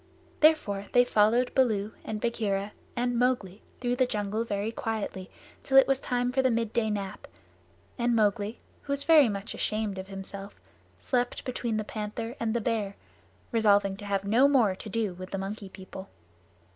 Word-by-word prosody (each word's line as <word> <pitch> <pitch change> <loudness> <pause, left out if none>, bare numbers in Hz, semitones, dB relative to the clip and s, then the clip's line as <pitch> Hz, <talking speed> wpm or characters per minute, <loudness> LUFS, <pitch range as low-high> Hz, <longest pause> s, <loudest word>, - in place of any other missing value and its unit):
Therefore 260 -11 +3
they 245 0 +6
followed 235 +2 +3
Baloo 215 -5 +2
and 215 -1 -4
Bagheera 210 -3 -1 0.2
and 245 -1 0
Mowgli 240 -6 0 0.2
through 245 0 -1
the 255 -1 +3
jungle 210 0 -1
very 205 -1 -2
quietly 215 -5 -4 0.3
till 270 - +2
it 270 - +9
was 270 -1 +2
time 245 -2 -1
for 265 - +2
the 260 - +3
midday 230 -1 0
nap, 200 -2 -4 0.7
and 240 0 +2
Mowgli, 210 0 +1 0.2
who 280 - -3
was 280 0 -2
very 305 -7 +6
much 200 0 -4
ashamed 215 -3 -2
of 190 - -7
himself, 195 +1 -8 0.4
slept 245 -1 -1
between 240 -3 -2
the 215 - -1
Panther 220 +3 -5
and 225 0 -1
the 235 - +1
Bear, 210 -3 -1 0.6
resolving 205 -4 +3
to 205 - -9
have 200 -1 -1
no 235 +7 +5
more 245 -9 +4
to 200 +3 -9
do 210 -2 -1
with 185 +1 -9
the 195 - -3
Monkey 195 +1 -5
People. 190 0 -10
220 Hz, 170 wpm, -28 LUFS, 200-245 Hz, 0.7 s, it